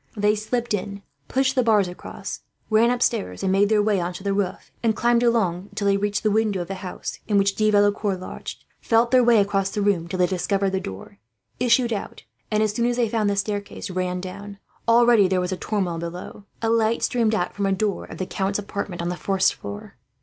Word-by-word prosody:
They 210 Hz, +1 st, +3 dB
slipped 230 Hz, +2 st, -2 dB
in, 200 Hz, 0 st, -3 dB, 0.2 s
pushed 265 Hz, 0 st, +1 dB
the 260 Hz, -, +3 dB
bars 215 Hz, -5 st, +3 dB
across, 180 Hz, -, -7 dB, 0.3 s
ran 220 Hz, +2 st, +5 dB
upstairs 235 Hz, -, 0 dB
and 190 Hz, -, +1 dB
made 200 Hz, +1 st, +3 dB
their 215 Hz, -1 st, +3 dB
way 205 Hz, -2 st, +2 dB
on 175 Hz, +1 st, -2 dB
to 185 Hz, -, -9 dB
the 200 Hz, -1 st, 0 dB
roof, 195 Hz, -2 st, -3 dB
and 225 Hz, -2 st, +1 dB
climbed 235 Hz, +1 st, +2 dB
along 200 Hz, -7 st, +1 dB
it -, -, -18 dB
until 200 Hz, -1 st, 0 dB
they 200 Hz, -, +4 dB
reached 205 Hz, +1 st, -1 dB
the 215 Hz, -, +2 dB
window 210 Hz, -3 st, +1 dB
of 175 Hz, -, -14 dB
the -, -, -2 dB
house 185 Hz, -2 st, -6 dB
in 205 Hz, -2 st, +2 dB
which 200 Hz, 0 st, +3 dB
De 215 Hz, +1 st, +2 dB
Valecourt 205 Hz, -1 st, +2 dB
lodged; 185 Hz, -, -8 dB
felt 230 Hz, +1 st, +2 dB
their 255 Hz, -1 st, +6 dB
way 235 Hz, -1 st, +5 dB
across 195 Hz, -1 st, +1 dB
the 205 Hz, -, -2 dB
room 185 Hz, -5 st, +1 dB
till 185 Hz, -, -4 dB
they 180 Hz, -, +4 dB
discovered 195 Hz, +2 st, 0 dB
the 190 Hz, -, 0 dB
door, 100 Hz, -, -9 dB, 0.4 s
issued 240 Hz, -1 st, +3 dB
out 205 Hz, -, -6 dB, 0.3 s
and, 215 Hz, 0 st, +2 dB
as 215 Hz, -1 st, 0 dB
soon 235 Hz, +1 st, +1 dB
as 245 Hz, -, 0 dB
they 240 Hz, -2 st, +2 dB
found 215 Hz, -2 st, +1 dB
the 200 Hz, -, 0 dB
staircase, 205 Hz, -1 st, -3 dB
ran 180 Hz, 0 st, -2 dB
down. 200 Hz, +2 st, -8 dB, 0.3 s
Already 230 Hz, -3 st, +6 dB
there 185 Hz, 0 st, +1 dB
was 180 Hz, +1 st, -2 dB
a 185 Hz, -, -2 dB
turmoil 185 Hz, -6 st, -2 dB
below. 175 Hz, +4 st, -7 dB, 0.2 s
A 225 Hz, -, +2 dB
light 230 Hz, 0 st, +2 dB
streamed 225 Hz, -3 st, +2 dB
out 180 Hz, -4 st, -1 dB
from 200 Hz, -1 st, -1 dB
a -, -, +1 dB
door 200 Hz, +1 st, -1 dB
of -, -, -10 dB
the 185 Hz, -, -2 dB
count's 195 Hz, +2 st, -1 dB
apartments 200 Hz, -3 st, -4 dB
on 170 Hz, -, -1 dB
the 180 Hz, -, -2 dB
first 190 Hz, +1 st, +1 dB
floor. 100 Hz, 0 st, -9 dB
205 Hz, 230 wpm, -23 LUFS, 190-220 Hz, 0.4 s, their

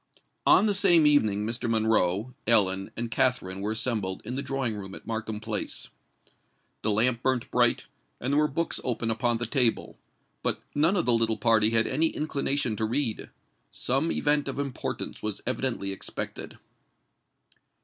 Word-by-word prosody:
On -, -, +6 dB
the 210 Hz, -, +2 dB
same 180 Hz, -5 st, +5 dB
evening 110 Hz, -9 st, +3 dB
Mr. 115 Hz, +1 st, -3 dB
Monroe, 110 Hz, 0 st, +1 dB
Ellen, 95 Hz, -4 st, +4 dB
and 115 Hz, 0 st, -3 dB
Katharine 115 Hz, -7 st, 0 dB
were 105 Hz, -, -2 dB
assembled 110 Hz, -5 st, -2 dB
in 120 Hz, -, -4 dB
the 135 Hz, -, -2 dB
drawing 135 Hz, -5 st, -2 dB
room 95 Hz, -2 st, -7 dB
at -, -, -13 dB
Markham 110 Hz, -1 st, -4 dB
Place. 110 Hz, -, -4 dB, 0.9 s
The 110 Hz, -, +1 dB
lamp 115 Hz, +3 st, +3 dB
burnt 130 Hz, -2 st, -1 dB
bright, -, -, +2 dB, 0.3 s
and 130 Hz, +3 st, -2 dB
there 145 Hz, -, +4 dB
were 150 Hz, -, +3 dB
books 165 Hz, +4 st, -2 dB
open 115 Hz, -2 st, -1 dB
upon 120 Hz, +1 st, 0 dB
the 120 Hz, -, -2 dB
table; 125 Hz, -5 st, 0 dB, 0.4 s
but -, -, -1 dB
none 160 Hz, +7 st, +2 dB
of 175 Hz, -, +1 dB
the 125 Hz, -, +5 dB
little 115 Hz, -1 st, +2 dB
party 110 Hz, -2 st, +3 dB
had 115 Hz, 0 st, +2 dB
any 155 Hz, +5 st, +1 dB
inclination 140 Hz, -6 st, -1 dB
to 110 Hz, -, 0 dB
read:—some 130 Hz, +3 st, -3 dB
event 145 Hz, -1 st, +1 dB
of 135 Hz, -, -4 dB
importance 140 Hz, -3 st, -4 dB
was 105 Hz, -2 st, -3 dB
evidently 125 Hz, -6 st, -1 dB
expected. 95 Hz, -, -7 dB
120 Hz, 160 wpm, -27 LUFS, 110-135 Hz, 0.9 s, On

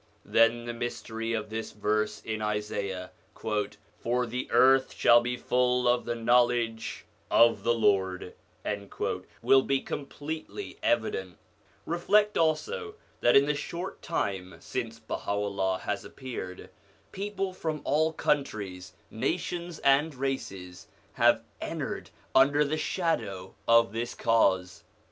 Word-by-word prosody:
Then 115 Hz, +1 st, +3 dB
the 120 Hz, -, -4 dB
mystery 115 Hz, -1 st, -4 dB
of 110 Hz, -1 st, -3 dB
this 110 Hz, 0 st, -4 dB
verse 105 Hz, +1 st, -1 dB
in 110 Hz, -1 st, -3 dB
Isaiah, 100 Hz, -3 st, -3 dB
' -, -, -36 dB, 0.6 s
For 125 Hz, +1 st, 0 dB
the 125 Hz, +2 st, -4 dB
earth 135 Hz, 0 st, +5 dB
shall 120 Hz, 0 st, +6 dB
be 125 Hz, +1 st, -2 dB
full 125 Hz, 0 st, +2 dB
of 120 Hz, 0 st, +2 dB
the 120 Hz, -, -2 dB
knowledge 120 Hz, -1 st, +1 dB, 0.2 s
of 115 Hz, 0 st, +5 dB
the 120 Hz, 0 st, +2 dB
Lord,' 95 Hz, -4 st, +1 dB, 1.1 s
will 135 Hz, -, +6 dB
be 135 Hz, 0 st, +1 dB
completely 155 Hz, -, -6 dB
evident 95 Hz, -6 st, 0 dB, 0.5 s
Reflect 205 Hz, +5 st, +2 dB
also 425 Hz, -, 0 dB, 0.2 s
that 120 Hz, -, +4 dB
in 140 Hz, -, +7 dB
the 150 Hz, -, +1 dB
short 170 Hz, +5 st, -5 dB
time 95 Hz, -, -2 dB
since 115 Hz, -3 st, -4 dB
Baha'u'llah 100 Hz, -4 st, -2 dB
has -, -, -3 dB
appeared, 105 Hz, -8 st, -7 dB, 0.4 s
people 195 Hz, -1 st, -3 dB
from 160 Hz, -5 st, -3 dB
all 155 Hz, +3 st, +2 dB
countries, 110 Hz, -, -2 dB, 0.2 s
nations, 170 Hz, +7 st, -2 dB
and 140 Hz, +2 st, +4 dB
races 100 Hz, -9 st, -4 dB, 0.3 s
have -, -, +4 dB, 0.2 s
entered -, -, -4 dB, 0.2 s
under 140 Hz, +3 st, +5 dB
the 150 Hz, +2 st, -1 dB
shadow 115 Hz, -, -2 dB
of 115 Hz, -2 st, +5 dB
this 120 Hz, +2 st, -3 dB
Cause. 95 Hz, -6 st, +2 dB
120 Hz, 120 wpm, -28 LUFS, 105-145 Hz, 1.1 s, in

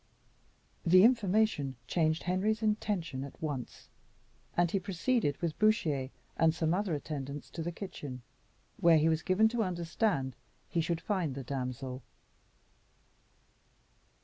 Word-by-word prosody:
The 185 Hz, +2 st, +7 dB
information 215 Hz, -, +3 dB
changed 160 Hz, +2 st, +1 dB
Henry's 205 Hz, +5 st, 0 dB
intentions 200 Hz, -10 st, -1 dB
at 140 Hz, -, -10 dB
once, 145 Hz, -6 st, -5 dB, 0.7 s
and 175 Hz, -1 st, +3 dB
he 195 Hz, -, +1 dB
proceeded 190 Hz, -, 0 dB
with 165 Hz, -3 st, -3 dB
Bouchier 160 Hz, -12 st, +2 dB, 0.3 s
and 160 Hz, 0 st, +4 dB
some 160 Hz, 0 st, +1 dB
other 190 Hz, -3 st, 0 dB
attendants 140 Hz, -1 st, -5 dB
to 165 Hz, -, -5 dB
the 170 Hz, +2 st, -2 dB
kitchen, 145 Hz, -9 st, -7 dB, 0.5 s
where 170 Hz, -6 st, +6 dB
he 155 Hz, +1 st, +3 dB
was 160 Hz, -1 st, +1 dB
given 190 Hz, +6 st, +4 dB
to 235 Hz, 0 st, -1 dB
understand 170 Hz, -, 0 dB, 0.3 s
he 170 Hz, -, 0 dB
should 165 Hz, 0 st, -1 dB
find 165 Hz, -6 st, -1 dB
the 135 Hz, -, -5 dB
damsel. 130 Hz, 0 st, -4 dB
165 Hz, 125 wpm, -32 LUFS, 145-195 Hz, 0.7 s, The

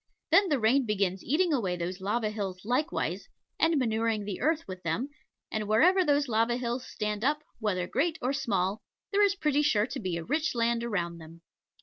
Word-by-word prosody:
Then 395 Hz, -2 st, +5 dB
the 290 Hz, -, +2 dB
rain 245 Hz, +3 st, +3 dB
begins 195 Hz, -3 st, 0 dB
eating 330 Hz, +4 st, +2 dB
away 195 Hz, -10 st, 0 dB
those 180 Hz, +2 st, -4 dB
lava 210 Hz, +2 st, 0 dB
hills 195 Hz, -3 st, -5 dB
likewise, 250 Hz, +6 st, -1 dB, 0.3 s
and 325 Hz, -1 st, +3 dB
manuring 225 Hz, -4 st, 0 dB
the 200 Hz, -2 st, -5 dB
earth 320 Hz, +1 st, +1 dB
with 185 Hz, -1 st, -7 dB
them; 180 Hz, -, -2 dB, 0.4 s
and 215 Hz, -1 st, -2 dB
wherever 360 Hz, -, +5 dB
those 290 Hz, -2 st, +2 dB
lava 230 Hz, +1 st, +1 dB
hills 245 Hz, +1 st, -3 dB
stand 210 Hz, 0 st, -3 dB
up, 300 Hz, +3 st, +1 dB, 0.2 s
whether 195 Hz, -5 st, -1 dB
great 310 Hz, -, 0 dB
or 255 Hz, +3 st, -1 dB
small, 205 Hz, -7 st, -1 dB, 0.3 s
there 405 Hz, 0 st, +3 dB
is 400 Hz, -1 st, +3 dB
pretty 300 Hz, -6 st, +1 dB
sure 220 Hz, -8 st, +3 dB
to -, -, -6 dB
be 180 Hz, -4 st, -2 dB
rich 300 Hz, -, -1 dB
land 235 Hz, 0 st, +1 dB
around 170 Hz, -7 st, -2 dB
them. 165 Hz, +1 st, -13 dB
230 Hz, 190 wpm, -29 LUFS, 195-285 Hz, 0.4 s, Then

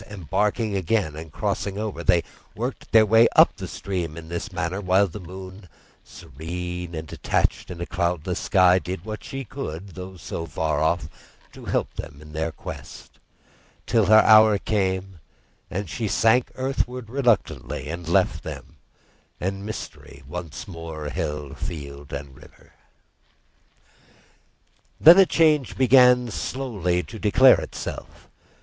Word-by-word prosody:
Embarking 105 Hz, +3 st, -1 dB
again 95 Hz, -4 st, 0 dB
and 80 Hz, 0 st, -9 dB
crossing 100 Hz, +6 st, -2 dB
over, 105 Hz, -5 st, -4 dB
they 85 Hz, -2 st, +3 dB, 0.3 s
worked -, -, -5 dB
their 110 Hz, -1 st, +7 dB
way 115 Hz, +2 st, +6 dB
up -, -, +6 dB
the -, -, -7 dB
stream 85 Hz, -5 st, -4 dB
in 80 Hz, -1 st, -9 dB
this 85 Hz, 0 st, -4 dB
manner, 90 Hz, +5 st, -3 dB
while 95 Hz, +1 st, +3 dB
the 100 Hz, +2 st, -7 dB
moon, 95 Hz, +1 st, -10 dB, 0.3 s
serene 90 Hz, +4 st, -7 dB
and 80 Hz, 0 st, -6 dB
detached -, -, -1 dB
in 90 Hz, -, -7 dB
a 85 Hz, -, -3 dB
cloudless 85 Hz, +1 st, -2 dB
sky, 95 Hz, -2 st, +4 dB
did 90 Hz, 0 st, -6 dB
what 110 Hz, -1 st, -6 dB
she 135 Hz, 0 st, -6 dB
could, 100 Hz, -, -7 dB
though 95 Hz, 0 st, -9 dB
so 80 Hz, +1 st, -6 dB
far 80 Hz, -3 st, -1 dB
off, 80 Hz, +2 st, +1 dB, 0.4 s
to -, -, -12 dB
help -, -, -1 dB
them 70 Hz, -, -8 dB
in 75 Hz, 0 st, -13 dB
their 80 Hz, +1 st, -2 dB
quest; -, -, -10 dB, 0.7 s
till 115 Hz, -5 st, +2 dB
her 110 Hz, +1 st, +8 dB
hour 110 Hz, -1 st, +7 dB
came 95 Hz, -3 st, -2 dB, 0.5 s
and 100 Hz, +1 st, -4 dB
she 110 Hz, +7 st, -3 dB
sank 115 Hz, +4 st, +3 dB
earthwards 125 Hz, -2 st, -2 dB
reluctantly, 120 Hz, -, 0 dB
and 85 Hz, +1 st, -6 dB
left 85 Hz, -, +2 dB
them, -, -, -9 dB, 0.6 s
and 95 Hz, +2 st, -3 dB
mystery 100 Hz, -9 st, -8 dB
once 85 Hz, +2 st, -7 dB
more 80 Hz, -4 st, -7 dB
held 75 Hz, -2 st, -4 dB
field 70 Hz, -3 st, -7 dB
and 70 Hz, -3 st, -7 dB
river. -, -, -19 dB, 2.3 s
Then 170 Hz, +5 st, +9 dB
a 190 Hz, -, +7 dB
change 155 Hz, -5 st, +2 dB
began 125 Hz, -2 st, +5 dB
slowly 100 Hz, -9 st, -2 dB
to 110 Hz, -, -10 dB
declare 125 Hz, +6 st, +6 dB
itself. -, -, -8 dB
95 Hz, 140 wpm, -24 LUFS, 80-110 Hz, 2.3 s, Then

